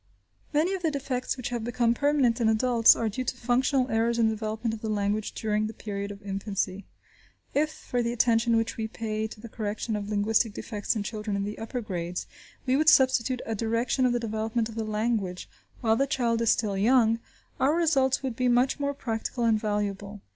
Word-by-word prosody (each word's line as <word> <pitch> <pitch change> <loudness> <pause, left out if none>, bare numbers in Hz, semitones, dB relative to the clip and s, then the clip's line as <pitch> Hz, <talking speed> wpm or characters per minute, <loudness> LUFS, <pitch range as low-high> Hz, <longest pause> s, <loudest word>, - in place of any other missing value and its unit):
Many 320 +6 +2
of 380 - -3
the 330 - +1
defects 270 -3 -2
which 250 - -4
have 240 -2 -3
become 235 0 +1
permanent 265 -3 +2
in 220 - +4
adults 230 +1 +5
are 230 - -1
due 220 +5 -3
to 250 - -2
functional 255 +2 +1
errors 230 +1 +1
in 225 -1 +4
the - - 0
development 220 +1 -3
of 220 - -6
the 220 - -3
language 205 0 -1
during 215 -1 -1
the 220 - -8
period 200 -1 -5
of 200 0 -9
infancy. 195 -1 -3 0.7
If, 305 +2 +2
for 245 -4 -3
the 235 0 -1
attention 230 0 +3
which 225 +1 -1
we 220 -1 -2
pay 220 -1 -3
to 215 - -12
the 235 - -9
correction 215 0 -3
of 205 -1 -4
linguistic 215 +1 +1
defects 210 0 -3
in 215 - -1
children 210 -1 -4
in 200 - -1
the 205 +1 -5
upper 235 +3 -4
grades, 180 -4 -4 0.4
we 260 0 +2
would 310 +2 +5
substitute 260 -2 +3
a 225 - -2
direction 230 +4 +1
of - - +1
the 240 - +1
development 225 0 -2
of - - -8
the 225 -1 -2
language 215 -4 -1 0.3
while 225 -2 +3
the 275 +4 +1
child 240 -5 0
is 230 - +2
still 210 -4 +1
young, 230 +2 +3 0.4
our 285 +4 +3
results 275 -6 +2
would 260 -3 -2
be 255 +1 +1
much 245 +4 +2
more 280 0 -1
practical 235 -1 -3
and 225 -2 +3
valuable. 205 -1 -3
225 Hz, 210 wpm, -27 LUFS, 215-250 Hz, 0.7 s, adults